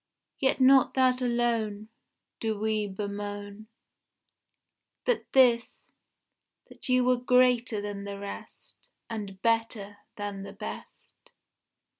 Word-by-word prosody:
Yet 265 0 +2
not 265 0 +5
that 255 -1 +3
alone 230 -4 0 0.5
Do 220 -2 -1
we 215 -1 0
bemoan; 205 +1 -6 1.4
But - - 0
this; 245 -3 +3 0.8
that - - -6
you 255 0 +4
were 250 0 +3
greater 250 -3 +3
than 205 -1 -5
the 200 0 -5
rest, 200 0 -10 0.2
And 200 -4 -6
better 225 -3 0 0.2
than 205 -1 -5
the 195 - -8
best. - - -10
220 Hz, 105 wpm, -28 LUFS, 205-250 Hz, 1.4 s, not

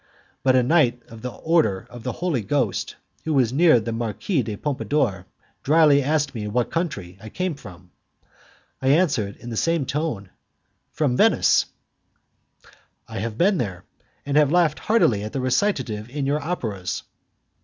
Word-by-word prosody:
But 130 -1 +3
a 130 - +4
knight 125 -4 +2
of 115 -1 -11
the 125 - -4
Order 150 - 0
of 120 - -9
the - - -3
Holy 170 -9 -1
Ghost, 120 -2 -1 0.3
who 160 -2 -1
was 125 -3 +2
near 155 -3 +5
the 115 +1 -4
Marquise 120 - -1
de 105 -1 -4
Pompadour, 135 -9 -1 0.3
dryly 150 -1 +5
asked 145 0 0
me 105 -3 -4
what 120 +3 -1
country 100 - -3
I 110 - -9
came 180 +4 -2
from. 90 - -13 0.9
I 130 - -1
answered, 135 - +2
in 120 - -9
the 115 - -4
same 165 -1 +1
tone, 140 - -3 0.6
"From 140 -5 0
Venice." - - +4 1.4
"I - - -6
have 110 +1 -4
been 190 0 +3
there, 95 -5 -4 0.4
and 140 +1 0
have 150 -2 +4
laughed 170 -3 +2
heartily 170 - +2
at 105 - -6
the 135 - -2
recitative 125 - -1
in 140 +1 -3
your 145 +2 0
operas." 110 - -4
130 Hz, 160 wpm, -23 LUFS, 110-155 Hz, 1.4 s, near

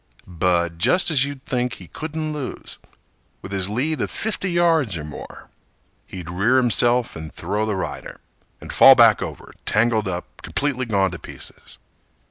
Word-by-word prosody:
But 85 -1 0
just 180 - +4
as 140 -3 +3
you'd 140 -2 -8
think 125 -1 -1
he 90 - -11
couldn't 155 - -5
lose, 145 -3 -7 0.6
With 95 - -8
his 95 -1 +1
lead 140 +9 -1
of - - -1
fifty 205 -3 -2
yards 165 - +2
or 75 - -6
more, 75 0 -10 0.6
He'd 90 -3 -8
rear 105 +9 +2
himself 120 0 +2
and 80 -1 -7
throw 105 +2 -2
the 105 - -1
rider, 95 - -6 0.4
And - - -8
fall - - +9
back - - +6
over, - - -7
tangled 110 -1 +1
up, 90 -1 -6
Completely 130 -3 -2
gone 100 -4 +1
to 90 - -7
pieces. - - -10
115 Hz, 160 wpm, -22 LUFS, 95-145 Hz, 0.6 s, fall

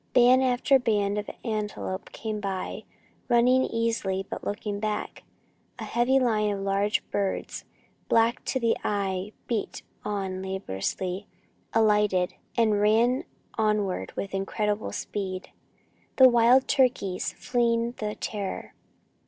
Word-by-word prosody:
Band 250 +1 +6
after 260 +2 +3
band 210 -4 +1
of 205 - -6 0.2
antelope 210 -4 -3
came 215 -2 -4
on, 190 -2 -3 0.5
running 250 +2 +5
easily, 225 -5 -1
but - - -6
looking 205 0 -3
back. 215 0 -3 0.6
A - - -6
heavy 245 +3 +2
line 220 -5 +2
of 200 -1 -2
large 200 +2 0
birds, 200 -1 -2 0.4
black 230 +2 +3
to 260 - 0
the 230 -2 +2
eye, 195 -1 -1
beat 230 -4 -3 0.2
on 195 -2 -3
laboriously, 190 - -3 0.4
alighted, 210 -4 +3 0.2
and 215 -3 +3
ran 230 +5 +3 0.3
onward 210 - 0
with 195 - -4
incredible 210 +2 -1
speed 185 -2 -4 0.6
the 260 - +9
wild 240 +2 +5
turkeys, 245 -8 +1
fleeing 235 -1 0
the 210 -1 -3
terror. 200 -3 -5
210 Hz, 120 wpm, -27 LUFS, 195-235 Hz, 0.6 s, the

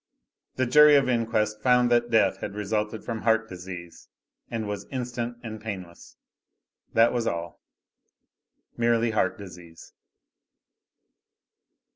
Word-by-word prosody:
The 130 - +1
jury 150 +4 +7
of 140 -2 +4
inquest 110 -3 0
found 125 0 +3
that 120 0 +3
death 110 -4 +3
had 100 - -6
resulted 105 +1 -2
from 115 -2 -4
heart 115 0 +2
disease, 90 -2 -10 0.4
and 110 -2 -3
was 105 -1 -5
instant 120 -2 -4
and 110 -2 -7
painless. 95 -6 -8 0.8
That 115 +1 +5
was 120 -2 -1
all. 85 -1 -4 1.1
Merely 115 -1 +2
heart 100 -4 0
disease. 90 -4 -12
110 Hz, 115 wpm, -26 LUFS, 100-120 Hz, 1.1 s, jury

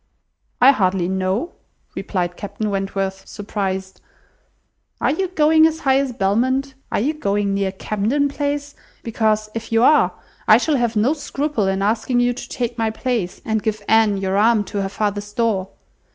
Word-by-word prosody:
"I 260 +3 +8
hardly 185 -7 +1
know," 190 - -1 0.4
replied 175 -3 -2
Captain 205 +2 -4
Wentworth, 195 -1 -2
surprised. 190 -2 -4 1.0
"Are - - +2
you 380 +5 -1
going 315 -2 +4
as 320 0 -4
high 270 -1 +3
as 275 -2 -1
Belmont? 255 +6 0 0.2
Are - - +1
you 280 +9 0
going 205 -8 -1
near 195 -1 0
Camden 215 +9 0
Place? 285 0 -3 0.3
Because, 215 -2 0
if 225 0 -6
you 225 +1 +3
are, 300 +3 +5 0.4
I - - +8
shall 305 -3 +1
have 240 -2 0
no 225 +7 +3
scruple 285 -7 -2
in 190 0 0
asking 225 +4 +1
you 245 0 +2
to 245 - -9
take 240 -1 -3
my 225 -1 +1
place, 220 -4 -3
and 220 -1 0
give 215 -1 -2
Anne 220 -2 +4
your 195 0 -1
arm 220 0 +4
to 205 +1 -4
her 195 - -2
father's 205 0 -3
door. 205 -5 0
220 Hz, 165 wpm, -20 LUFS, 195-260 Hz, 1.0 s, I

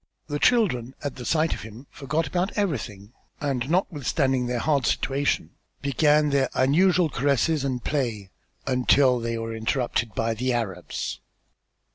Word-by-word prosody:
The 145 -1 -3
children 140 - +2
at 145 -2 -4
the 125 - -7
sight 160 +2 +2
of - - -7
him 110 +5 -10
forgot 150 +4 -2
about 185 +4 -2
everything, 120 - -3 0.3
and 135 -3 -2
notwithstanding 140 -7 0
their 125 0 -1
hard 140 0 +1
situation 140 +1 0 0.3
began 150 +1 +3
their 135 -2 +2 0.2
usual 180 +3 +4
caresses 140 +2 +1
and 130 -3 -2
play 115 -10 -2 0.3
until 125 0 +3
they 115 0 -2
were 115 0 -4
interrupted 115 -1 -1
by 115 +2 0
the 125 +3 -1
Arabs. 115 -7 -3
135 Hz, 140 wpm, -25 LUFS, 120-150 Hz, 0.3 s, usual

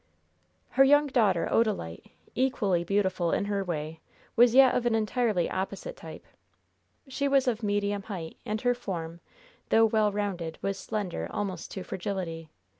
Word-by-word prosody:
Her 270 - +5
young 290 +2 +5
daughter, 215 -11 +2
Odalite, 210 - -1 0.2
equally 215 -9 +1
beautiful 185 -2 0
in - - 0
her 200 -1 -1
way, 160 -2 -4 0.4
was 240 0 +5
yet 265 -1 +7
of 240 -1 +1
an 230 - +2
entirely 215 -4 +1
opposite 195 - -4
type. - - -11 0.8
She 280 +1 -1
was 275 -1 +3
of 235 -2 0
medium 205 -1 0
height, 180 -6 -7
and 215 +1 -3
her 245 -1 +3
form, 170 -8 -6 0.5
though 225 0 +5
well 215 -1 +2
rounded, 190 -6 -3
was 195 0 -2
slender 205 -5 -3
almost 190 -4 -4
to 190 - -5
fragility. 175 -4 -5
205 Hz, 150 wpm, -28 LUFS, 180-235 Hz, 0.8 s, yet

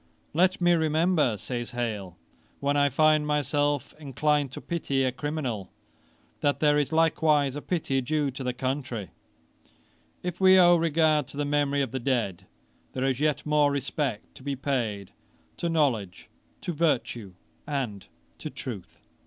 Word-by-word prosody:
"Let 185 +4 +3
me 175 -1 +4
remember, 160 - +2
(says 120 +2 -5
Hale,) 105 -7 -3 0.4
when 140 +1 0
I 145 0 +4
find 155 +2 +3
myself 145 -1 0
inclined 145 -1 0
to - - -6
pity 140 -6 -1
a 130 - +1
criminal, 130 -7 -4 0.7
that 145 -1 +1
there 150 -1 +4
is 145 - -1
likewise 155 -3 +3
a 145 - -4
pity 145 -7 -1
due 145 +1 0
to 130 +1 -7
the 125 - 0
country." 130 - -3 1.1
If 180 0 -4
we 190 0 +7
owe 175 -1 +7
regard 160 -3 +2
to - - -11
the 145 - 0
memory 145 -1 +1
of 130 - -4
the 130 - -3
dead, 120 -8 -1 0.5
there 130 0 -1
is 135 -1 0
yet 150 -1 0
more 150 -1 +3
respect 140 -4 -3
to - - -14
be 140 +1 -3
paid 115 -8 -2 0.5
to 170 - -1
knowledge, 125 - 0 0.3
to 175 - -3
virtue 120 - -1 0.3
and 125 -9 -3 0.3
to - - -5
truth.' - - -8
145 Hz, 155 wpm, -27 LUFS, 130-155 Hz, 1.1 s, we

